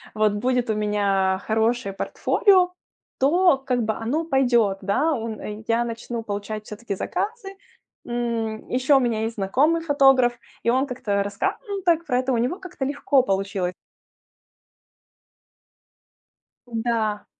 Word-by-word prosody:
вот 215 -1 +2
будет 245 +3 0
у - - +2
меня 200 -3 +1
хорошее 220 -1 +1
портфолио, 365 - +2 0.5
то 340 +3 +4
как 255 -2 -1
бы 220 0 0
оно 265 +10 -2
пойдет. 245 -9 +2
Да, 250 +12 +1
он, 225 -4 -4
э, 210 +1 -7
я 235 +1 +2
начну 230 0 -5
получать 210 0 -5
всё-таки 210 -1 -5
заказы. 410 - -4 0.5
М, 235 -2 -3
ещё 260 +3 +3
у - - +4
меня 230 -3 0
есть 225 +1 -3
знакомый 290 +12 +2
фотограф, 270 -5 +4 0.3
и - - +2
он 260 +3 +2
как-то 250 -5 -5
рассказывал 390 - -3
так 335 -1 +3
про 250 - +1
это, 260 +1 -1
у 235 - +1
него 255 +11 -1
как-то 345 -7 -5
легко 280 -1 +2
получилось. 195 -3 -1 2.9
Да. 225 -3 -1
235 Hz, 135 wpm, -23 LUFS, 215-270 Hz, 2.9 s, то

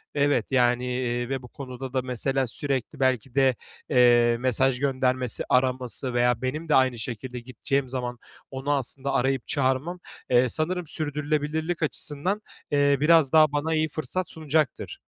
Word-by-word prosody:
evet, 145 0 +1
yani, 125 -1 +2
eee, 125 -1 -2
ve 135 -1 -2
bu 125 - -11
konuda 130 0 -8
da, 130 - +1
mesela, 130 +1 -1
sürekli 135 +2 -3
belki 130 -1 0
de, 135 -2 +3 0.3
eee, 120 -3 +4
mesaj 130 +1 +1
göndermesi, 130 -3 0
araması 130 0 +1
veya 120 -1 +2
benim 155 +6 -4
de - - +4
aynı 130 -3 +3
şekilde 125 +2 -6
gideceğim 130 +2 -3
zaman 125 -1 -4 0.3
onu 135 +2 -3
aslında 140 0 0
arayıp 130 0 0
çağırmam, 140 +5 -1 0.3
eee, 125 0 +4
sanırım 170 +3 -1
sürdürülebilirlik 155 +2 -2
açısından, 155 +7 0 0.3
eee, 145 -1 +3
biraz 155 -2 +4
daha 155 -2 +5
bana 150 +2 -1
iyi 155 0 +1
fırsat 155 +5 -3
sunacaktır. 155 -3 -2
135 Hz, 145 wpm, -25 LUFS, 125-150 Hz, 0.3 s, daha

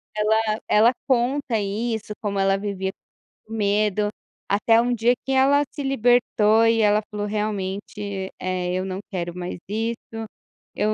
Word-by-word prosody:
ela 215 0 +1
ela 220 +3 +5 0.2
conta 255 -1 +1
isso, 215 +2 -2
como 200 -2 -2
ela 195 0 +3
vivia 195 -2 -3 0.6
medo, 210 -1 +1 0.4
até 225 +3 +4
um 245 +1 +1
dia 235 +2 +3
que 270 - -2
ela 275 +2 +4
se 290 - -6
libertou, 235 -4 +3
e 225 0 +3
ela 210 0 +4
falou: 210 0 -3
"Realmente, 200 -1 -3
eh, 180 -1 -2
eu 185 +1 -1
não 190 0 -4
quero 175 -2 -3
mais 180 0 -4
isso, 225 +1 -4 0.5
eu 215 +1 +1
215 Hz, 145 wpm, -23 LUFS, 200-230 Hz, 0.6 s, ela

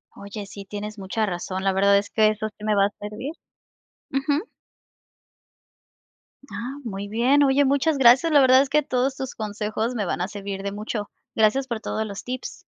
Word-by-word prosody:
Oye, 200 +1 -7
sí, 200 0 -9
tienes 210 +2 -6
mucha 205 +3 -1
razón, 185 0 -4
la 195 - +3
verdad 200 +1 +4
es 200 0 -1
que 215 -1 +4
eso 215 0 -2
sí 210 - -13
me 215 -1 +1
va 200 0 +4
a 205 - -4
servir. 210 +8 -6 0.8
Ujú. 280 +4 0 2.1
Ah, 255 +4 -5
muy 200 -3 -5
bien. 250 +7 +3
Oye, 275 +1 +4
muchas 285 +3 +2
gracias, 265 +5 +6
la 290 -2 +6
verdad 260 0 +7
es 275 - -1
que 300 +1 +3
todos 260 0 0
tus 265 -1 -5
consejos 215 +2 -3
me 205 -3 -1
van 175 - -2
a 180 - 0
servir 200 -1 -6
de 200 - -2
mucho. 210 0 -4 0.3
Gracias 225 +5 +3
por 235 -3 -3
todos 220 -1 -2
los 200 -2 -7
tips. 255 0 -6
215 Hz, 190 wpm, -24 LUFS, 200-265 Hz, 2.1 s, verdad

